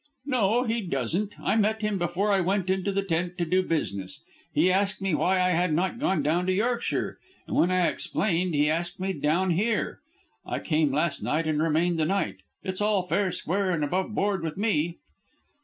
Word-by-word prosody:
"No, 245 -3 +2
he 230 -1 -1
doesn't. 180 - -2
I - - 0
met 220 0 +1
him 210 -2 0
before 175 +4 0
I 195 -1 +3
went 190 +1 0
into 190 +1 0
the 195 0 0
tent 175 -1 -2
to 175 - 0
do 185 +3 +2
business. 140 - -3 0.3
He 185 - +3
asked 195 +1 +1
me 195 -3 -1
why 185 +4 +2
I 180 0 +3
had 175 -1 +1
not 190 +7 -1
gone 190 - +1
to 175 +5 +1
Yorkshire, 235 +5 -1 0.3
and - - -4
when 175 - +4
I 185 -1 +3
explained 180 -2 0
he 145 +1 +3
asked 175 +4 -1
me 190 +1 -1
down 170 +5 +1
here. 210 +6 0 0.4
I - - -3
came 155 -3 +1
last 150 +2 0
night 160 +1 0
and 155 -1 0
remained 165 +2 +1
the 155 - +2
night. 160 - -1 0.3
It's 185 0 -4
all 205 -3 +2
fair, 185 +1 0
square, 190 +4 -1
and 165 -4 0
above 185 +7 -1
board 200 -2 0
with 160 +1 -4
me." 175 -6 0
185 Hz, 195 wpm, -27 LUFS, 165-200 Hz, 0.4 s, when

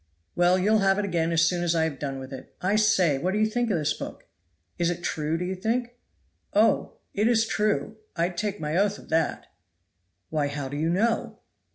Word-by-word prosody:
"Well, 175 +1 +4
you'll 210 +4 +3
have 195 -1 +3
it 205 - 0
again 170 -3 0
as 165 0 +3
soon 175 +1 +1
as 170 -1 +1
I 160 - +3
have 155 -4 -2
done 135 -2 -3
with 130 0 -8
it. 130 - -10
I 195 +3 +1
say, 190 -9 +3
what 185 +5 -1
do - - 0
you 215 - +4
think 235 +2 0
of 195 - +1
this 150 -1 0
book? - - -8 0.5
is 170 0 +2
it 175 0 -4
true 155 0 -1
do 180 - -3
you 185 - -2
think?" 230 +6 -1 0.6
"Oh! - - +3 0.2
it 210 +2 +2
is 230 -2 +3
true 215 0 0 0.2
I'd 175 +1 0
take 205 +3 -2
my 150 +1 -2
oath 205 +1 +2
of - - -15
that." 160 -1 0 0.9
"Why 150 -2 +1
how 140 -1 -4
do 145 - -5
you 160 +2 0
know?" 225 +6 0
175 Hz, 220 wpm, -26 LUFS, 160-210 Hz, 0.9 s, Well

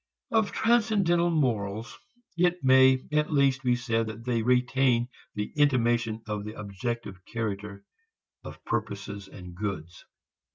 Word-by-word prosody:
Of 220 -3 +2
transcendental 210 -7 +2
morals, 115 -8 -1 0.4
it 175 0 +1
may 130 0 +5
at 150 +1 +1
least 140 -2 +3
be 125 -2 +2
said 115 -2 -1
that 110 +2 -8
they 120 -2 0
retain 125 0 +2 0.3
the 105 0 -4
intimation 120 -6 +2
of 105 -1 -3
the 105 +1 -8
objective 100 -1 -5
character 105 -3 -5 0.6
of - - -11
purposes 100 -3 -4
and 90 -2 -11
goods. 90 -3 -5
120 Hz, 125 wpm, -27 LUFS, 105-135 Hz, 0.6 s, may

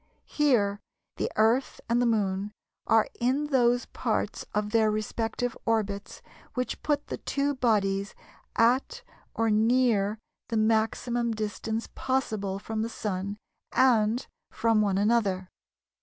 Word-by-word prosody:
Here 220 -9 +2 0.4
the - - -1
Earth 230 +5 +2
and 235 +1 +2
the 245 - +3
Moon 205 -2 0 0.3
are 225 -1 +4
in 275 +5 0
those 245 -2 +3
parts - - -2
of 210 0 -1
their 220 -1 +4
respective 225 +3 -2
orbits 205 -3 -2 0.3
which 250 -1 -2
put 295 -1 0
the - - -5
two 285 0 -1
bodies 205 -6 +1 0.4
at 260 - +2 0.3
or 225 -1 +1
near 220 -2 +3 0.3
the 230 - 0
maximum 225 +2 +1
distance 220 +1 -3
possible 220 -7 -1
from 215 +2 -4
the 225 - -2
Sun 200 -2 -3 0.4
and 235 -2 +3 0.2
from 225 -2 +2
one 200 -2 +1
another. 200 -3 +1
225 Hz, 125 wpm, -28 LUFS, 210-245 Hz, 0.4 s, are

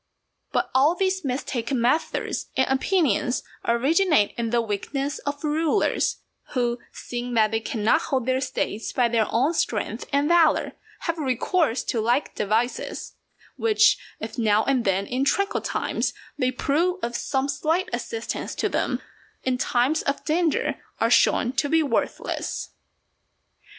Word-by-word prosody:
But - - 0
all 285 +6 +4
these 380 0 0
mistaken 255 -2 -2
methods 255 +7 0
and 260 - +3
opinions 265 - +1 0.2
originate 280 - +3
in 235 -1 -2
the 240 +1 +2
weakness 270 +7 -2
of 285 +1 -3
rulers, 315 +5 +1 0.4
who, 240 -2 0
seeing 245 0 -5
that 215 -2 +4
they 225 - +1
cannot 220 0 +1
hold 260 -3 -1
their 260 +1 +1
States 225 -4 -2
by 245 -2 +2
their 225 -2 +2
own 270 +8 +2
strength 225 -6 -2
and 285 +1 +2
valour, 340 -1 +4 0.3
have 335 -1 -2
recourse 275 0 +1
to 235 -5 -1
like 240 +6 +1
devices; 220 +4 -1 0.4
which, 435 -1 +4 0.2
if - - -6
now 215 -1 +3
and 260 -3 +1
then 195 0 +1
in 255 +4 -1
tranquil 395 +9 +1
times - - -2 0.2
they 255 - +1
prove 320 +8 0
of 240 0 -2
some 270 +1 -1
slight 320 +6 0
assistance 460 - -4
to - - 0
them, - - -1 0.4
in 260 -1 +1
times 250 +5 +1
of 280 0 -2
danger 325 0 +1 0.2
are - - +2
shown 245 - +4
to 285 +1 0
be 325 +1 +3
worthless. 285 - -2
265 Hz, 145 wpm, -24 LUFS, 235-315 Hz, 0.4 s, all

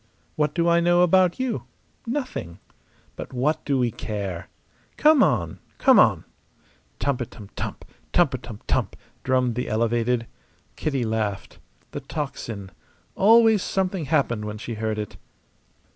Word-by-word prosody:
What 150 -1 0
do 170 -1 +2
I 170 0 +5
know 175 +1 +4
about 180 +2 +4
you? 255 -2 -2 0.4
Nothing. 240 - -4 0.6
But - - -8
what 150 +5 0
do 140 -2 +1
we 125 -2 +1
care? 100 -5 -5 0.5
Come 305 -2 +6
on, 85 -9 +1 0.2
come - - +6
on!" - - +4 0.7
Tumpitum 120 -6 -3
tump! - - -5 0.3
tumpitum - - 0
tump! - - 0 0.3
drummed 130 -2 +2
the 125 +2 -3
Elevated. 115 +2 +1 0.5
Kitty 140 -5 -1
laughed. 110 -3 -3 0.3
The - - -5
tocsin! 110 -9 -5 0.4
Always 220 0 +5
something 190 -4 -1
happened 130 -8 +1
when 105 0 -5
she 115 +2 -6
heard 110 0 -2
it. 105 -1 -5
130 Hz, 130 wpm, -24 LUFS, 110-175 Hz, 0.7 s, Come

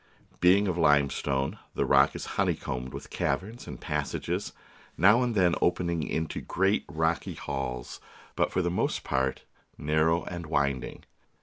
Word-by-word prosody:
Being 95 +3 +5
of 90 -2 -1
limestone, 70 -3 +2 0.2
the - - +1
rock 70 +1 +4
is - - -5 0.2
honeycombed 65 0 -2
with - - -9
caverns 100 - -2
and - - -7
passages, - - -2 0.5
now 105 +8 +6
and 120 -2 0
then 90 -3 +4
opening 85 -2 +1
into 80 +1 -2
great 95 +3 +1
rocky 80 +2 -1
halls, 65 -3 -4 0.4
but - - +1
for 90 - 0
the 85 - 0
most 90 - -1
part 65 0 -1 0.3
narrow 80 +3 +2
and 85 -2 -6
winding. 70 -4 -1
80 Hz, 140 wpm, -28 LUFS, 70-90 Hz, 0.5 s, now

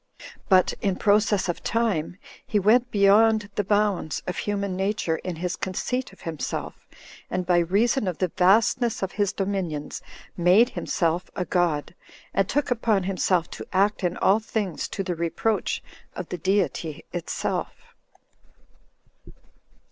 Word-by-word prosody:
But, 185 -2 +5
in 195 -2 +1
process 205 0 +2
of 175 - -3
time, 210 -7 0 0.3
he 225 - -1
went 230 +5 +4
beyond 210 +1 +4
the 205 - 0
bounds 205 -6 0
of 180 - -3
human 200 -2 -2
nature 190 -4 -1
in 180 0 -5
his 180 +2 -3
conceit 245 +8 -3
of 190 - -18
himself, 160 -4 -5 0.4
and 180 0 -2
by 175 -1 +3
reason 205 +7 +1
of 180 -3 -2
the 185 - 0
vastness 220 +5 +3
of 190 - -2
his 205 -2 0
dominions 190 -7 -3 0.3
made 185 +8 +5
himself 170 +1 -1
a 180 - -2
god, 170 -4 0 0.4
and 195 -1 +1
took 290 -2 0
upon 225 -5 +1
himself 185 -2 +1
to - - -8
act 200 +2 +1
in 180 0 0
all 200 +3 +4
things 210 -6 -3
to 195 - -4
the 180 -1 -2
reproach 170 +5 -1 0.3
of 180 - -6
the 180 - -4
Deity 180 -4 -1
itself. 470 - -4
195 Hz, 140 wpm, -25 LUFS, 180-210 Hz, 0.4 s, But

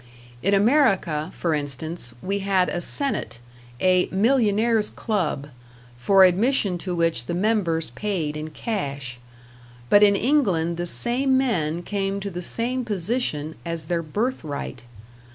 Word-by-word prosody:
In 200 +2 +2
America, 195 - +2
for 170 -2 -1
instance, 145 -1 -4
we 200 +2 -1
had 190 -2 +1
a 175 - -3
Senate, 275 - -2 0.4
a 185 -1 +3
"Millionaire's 220 0 +2
Club", 165 - -2 0.5
for 190 +11 +5
admission 190 0 +2
to 180 0 -4
which 165 -8 0
the 170 - -2
members 175 - 0
paid 160 - -3
in 155 +1 -5
cash; 140 - -4 0.7
but 205 - +7
in 205 -1 +6
England 195 - +1
the 175 0 -2
same 260 +7 +3
men 175 - 0
came 195 0 -2
to 200 0 -5
the 180 0 -5
same 245 +7 -1
position 190 - -2
as 165 -2 -4
their 170 +1 -1
birth 215 - -2
right. 140 -4 -6
185 Hz, 135 wpm, -23 LUFS, 160-215 Hz, 0.7 s, but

